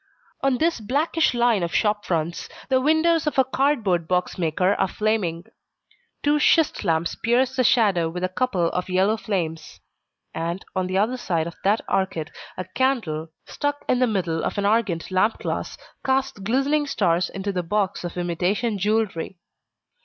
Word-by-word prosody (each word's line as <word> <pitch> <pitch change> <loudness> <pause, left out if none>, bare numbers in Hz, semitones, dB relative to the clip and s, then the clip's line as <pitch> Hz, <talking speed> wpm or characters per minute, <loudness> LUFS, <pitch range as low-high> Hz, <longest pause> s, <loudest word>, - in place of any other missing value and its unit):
On 270 -2 +2
this 330 0 +1
blackish 285 +6 +1
line 235 -4 +3
of 170 -1 -2
shop 210 -1 +1
fronts, 165 -1 -2 0.2
the 260 -1 +3
windows 315 +2 +3
of 300 - -1
a 265 - +6
cardboard 235 - +1
box 180 0 0
maker 180 +3 +1
are - - +1
flaming: 195 -6 -1 0.8
two 295 +1 +3
schist 320 +1 +3
lamps 165 -2 0
pierce 250 +3 +1
the 255 - +2
shadow 205 -9 +3
with 180 +2 -5
a - - +2
couple 185 -4 0
of 180 +1 -3
yellow 190 +4 +2
flames. 170 -8 -4 0.5
And, 170 +3 -3
on 185 -1 0
the 185 +1 -1
other 225 +6 +1
side 170 -9 -1
of 170 - -6
the 205 +3 +3
arcade 190 -5 -1 0.3
a 185 - -4
candle, 220 - 0 0.2
stuck 290 0 -3
in 250 - +2
the 255 - +3
middle 180 -7 -1
of - - -2
an 200 - 0
argand 205 -6 +1
lamp 190 +4 +2
glass, - - -4 0.3
casts 265 -4 0
glistening 275 +8 +1
stars 175 -8 +1
into 195 +1 -3
the 185 -2 -1
box 195 +2 -1
of 175 0 -6
imitation 185 +5 -1
jewelry. 205 -3 -1
205 Hz, 170 wpm, -23 LUFS, 175-255 Hz, 0.8 s, a